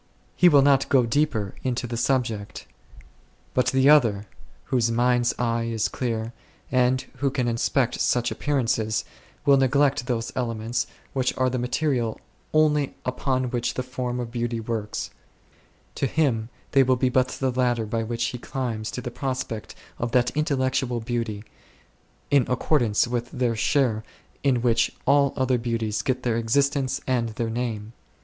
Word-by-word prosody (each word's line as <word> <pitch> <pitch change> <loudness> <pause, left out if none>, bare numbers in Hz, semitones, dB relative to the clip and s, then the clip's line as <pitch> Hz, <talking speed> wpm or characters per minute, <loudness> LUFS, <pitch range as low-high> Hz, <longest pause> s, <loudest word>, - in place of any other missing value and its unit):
He 180 - +6
will 145 -4 +6
not 140 -1 +3
go 130 -3 +4
deeper 115 -6 0
into 125 -1 -2
the 120 0 -4
subject. 115 -4 -1 0.9
But 125 - +2
the 130 0 +3
other, 115 -9 +5 0.4
whose 120 -3 +1
mind's 120 +1 +2
eye 115 -1 0
is 115 -2 0
clear, 115 -2 -3 0.4
and 130 0 +3 0.2
who 140 - +1
can 130 -2 -1
inspect 120 +2 0
such 125 -1 +1
appearances, 120 -6 0 0.4
will 140 -1 +6
neglect 135 -1 +2
those 115 -3 -2
elements 120 -1 -2 0.3
which 130 -2 0
are 130 -1 +2
the 130 - -1
material 125 -2 -1 0.3
only 150 -2 +2
upon 130 0 -1
which 120 -1 -1
the 130 - -2
Form 125 -1 -4
of 120 -2 -4
Beauty 120 -1 -2
works; 110 -2 -4 0.8
to 135 - -1
him 120 -7 0 0.2
they 135 - +5
will 130 -1 +3
be 125 +1 +1
but 130 0 +2
the 130 0 -2
ladder 120 -2 +1
by 115 +2 -2
which 115 +1 -2
he 125 - -6
climbs 120 -4 -3
to 125 - -5
the 120 - -5
prospect 130 -5 -4 0.2
of 120 0 -2
that 125 -1 +3
Intel 150 -1 0
lectual 130 -3 -1
Beauty, 115 -3 -3 0.9
in 140 -4 +4
accordance 125 -4 +2
with 120 0 -2
their 125 -2 -1
share 115 -1 +1 0.4
in 130 -4 +1
which 115 -1 +2
all 140 -1 +4
other 130 -1 +2
beauties 115 -3 -1
get 130 +2 -1
their 115 -2 +1
existence 140 +3 +1
and 120 -3 0
their 115 -2 -2
name. 115 -2 -3
125 Hz, 155 wpm, -25 LUFS, 115-130 Hz, 0.9 s, He